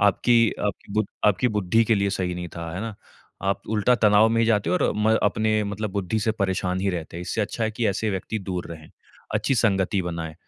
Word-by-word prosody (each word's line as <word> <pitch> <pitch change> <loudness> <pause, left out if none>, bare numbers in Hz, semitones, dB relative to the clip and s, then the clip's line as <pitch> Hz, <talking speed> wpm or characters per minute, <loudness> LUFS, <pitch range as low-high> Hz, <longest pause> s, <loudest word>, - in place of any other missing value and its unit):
आपकी 115 +3 +4 0.2
आपकी 100 0 -5
बु 110 0 +2 0.2
आपकी 105 +4 +3
बुद्धि 105 +3 +2
के 115 - +3
लिए 100 -1 +1
सही 90 -2 -2
नहीं 90 -1 -5
था, 85 -1 -5
है 90 - -4
ना? 110 0 -5 0.5
आप 95 0 -1
उल्टा 110 +3 +3
तनाव 105 0 +5
में 115 0 +2
जाते 105 -6 +2
और 90 - +2
म 110 +1 +3
अपने 110 +1 +1
मतलब 105 +1 -3
बुद्धि 100 +2 -1
से 110 +1 +1
परेशान 95 -3 -1
ही 100 +1 +1
रहते 85 -2 -5
हो। 85 - -5
इससे 110 - -2
अच्छा 110 +2 -2
है 110 - 0
कि 115 0 -1
ऐसे 105 +2 -1
व्यक्ति 95 +3 -3
दूर 90 -3 -4
रहें, 80 -1 -12 0.4
अच्छी 110 +6 +1
संगति 95 -3 +1
बनाएँ। 85 -2 -5
100 Hz, 220 wpm, -24 LUFS, 90-110 Hz, 0.5 s, तनाव